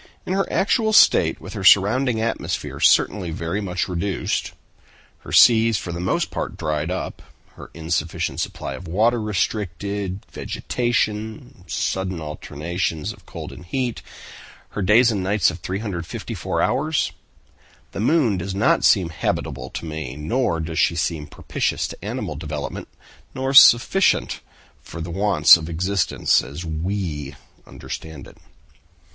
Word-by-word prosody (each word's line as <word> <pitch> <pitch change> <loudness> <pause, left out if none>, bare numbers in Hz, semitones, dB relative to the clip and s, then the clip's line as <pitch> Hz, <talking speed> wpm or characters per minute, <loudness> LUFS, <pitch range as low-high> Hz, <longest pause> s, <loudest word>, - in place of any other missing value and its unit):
"In 185 - -2
her 195 0 -1
actual 220 +2 +1
state, - - +5
with - - -9
her 95 - -5
surrounding 110 +6 +4
atmosphere 115 +1 -3
certainly 95 -4 +3
very 85 +5 -3
much 90 -2 -2
reduced, 90 +2 -2 0.7
her - - -11
seas 115 -2 +6
for 90 - -5
the 85 - -5
most 90 - -1
part - - -4
dried 75 0 -2
up, 90 0 -4 0.3
her - - -12
insufficient 80 0 -2
supply - - -4
of 90 - -9
water 110 +7 +2
restricted, 100 -1 -3
vegetation, 110 -3 -3
sudden 95 -2 -2
alternations 80 +1 -4
of - - -21
cold - - -8
and 85 - -12
heat, 125 +5 -2 0.7
her 105 - -5
days 115 +5 +5
and 100 -3 -2
nights 95 -1 +2
of 90 - -9
354 90 -2 -4
hours—the 150 -7 -4
moon 115 - +2
does 95 +2 -4
not 100 - +2
seem 95 -5 +4
habitable 80 - -3
to - - -6
me, 80 -2 -5
nor 80 - -1
does 80 +1 -3
she 85 - +3
seem 80 -3 -2
propitious - - -2
to - - -11
animal 75 - -4
development, 75 -1 -5 0.5
nor 135 +1 -2
sufficient 135 +9 +6 0.4
for - - -10
the 85 +1 -5
wants 95 -4 +6
of 80 -1 -7
existence 95 +3 +1
as 70 +6 -8
we 80 -4 -3 0.3
understand 80 -4 -8
it." - - -16
95 Hz, 135 wpm, -22 LUFS, 80-110 Hz, 0.7 s, seas